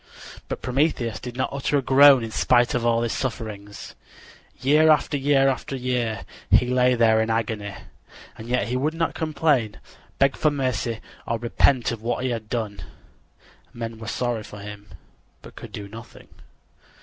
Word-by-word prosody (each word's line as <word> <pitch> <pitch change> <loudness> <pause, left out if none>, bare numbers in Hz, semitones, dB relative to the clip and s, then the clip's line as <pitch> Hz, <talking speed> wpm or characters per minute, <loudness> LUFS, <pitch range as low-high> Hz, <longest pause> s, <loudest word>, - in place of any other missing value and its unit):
But - - -5
Prometheus 125 -4 0
did 125 -1 -8
not 130 - 0
utter 140 +1 0
a - - +1
groan 135 -1 +7
in 115 - -5
spite 120 +1 +3
of 125 - -1
all 115 0 +2
his 115 - -1
sufferings. 105 -5 -5 0.7
Year 150 +5 +4
after 150 0 +3
year 130 -4 0 0.2
he - - +5
lay 125 0 +3
in 110 -2 +3
agony, 110 -3 -2 0.6
and 110 - -10
yet 125 -1 0
he 125 - -1
would 150 +5 -1
not 165 0 -1
complain, 150 - 0 0.4
beg 135 0 +3
for 155 - +2
mercy 125 -5 -2 0.3
or 115 - 0
repent 120 +1 +2
of 115 -2 -6
what 120 +2 -2
he 130 - 0
had 110 -2 -5
done. 110 -4 -3 0.9
Men 115 -1 -6
were 110 - -8
sorry 120 +1 -2
for 105 - -11
him, 105 0 -9 0.6
but - - -13
could - - -10
do 100 - -7
nothing. 115 +3 -12
120 Hz, 160 wpm, -24 LUFS, 110-135 Hz, 0.9 s, groan